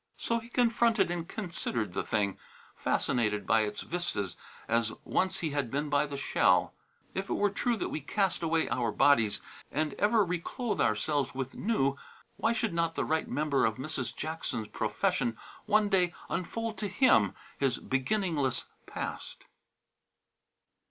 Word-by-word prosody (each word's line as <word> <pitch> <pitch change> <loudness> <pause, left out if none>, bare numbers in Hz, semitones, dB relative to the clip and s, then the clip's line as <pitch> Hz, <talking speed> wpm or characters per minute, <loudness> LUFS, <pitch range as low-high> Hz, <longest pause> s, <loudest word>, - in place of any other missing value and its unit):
So 230 0 0
he 230 +1 -13
confronted 235 -5 +3
and 170 -1 -3
considered 165 - -3
the - - 0
thing, 100 -3 -1 0.4
fascinated 105 -4 0
by 110 - +4
its 105 -1 -2
vistas 135 - -2 0.3
as 115 -1 +1
once 190 0 0
he 160 -3 -1
had 140 -4 -1
been 145 +4 -1
by 145 +1 +3
the 140 -1 -5
shell. 95 -8 +3 0.4
If 195 +1 -3
it - - +1
were 205 -1 +2
true 235 +3 0
that - - -2
we 155 - -3
cast 195 +6 0
away 165 -1 +1
our - - 0
worn 110 -3 -1
bodies 115 -8 +4 0.3
and 155 0 0
ever 210 0 +4
reclothe 180 +7 -2
ourselves 130 +6 +1
with 135 -1 -3
new, 140 -11 +1 0.4
why 225 - +2
should 225 -4 0
not 165 -1 0
the - - 0
right 160 0 0
member 150 -2 +1
of 110 - +2
Mrs. 130 -2 -3
Jackson's 155 -8 -4
profession 115 -2 0 0.3
one 210 0 +4
day 180 -3 +2 0.2
unfold 220 +3 -3
to 205 - -1
him 190 - +4 0.2
his 135 -3 +2
beginningless 145 - 0 0.2
past? - - -5
155 Hz, 155 wpm, -30 LUFS, 125-200 Hz, 0.4 s, by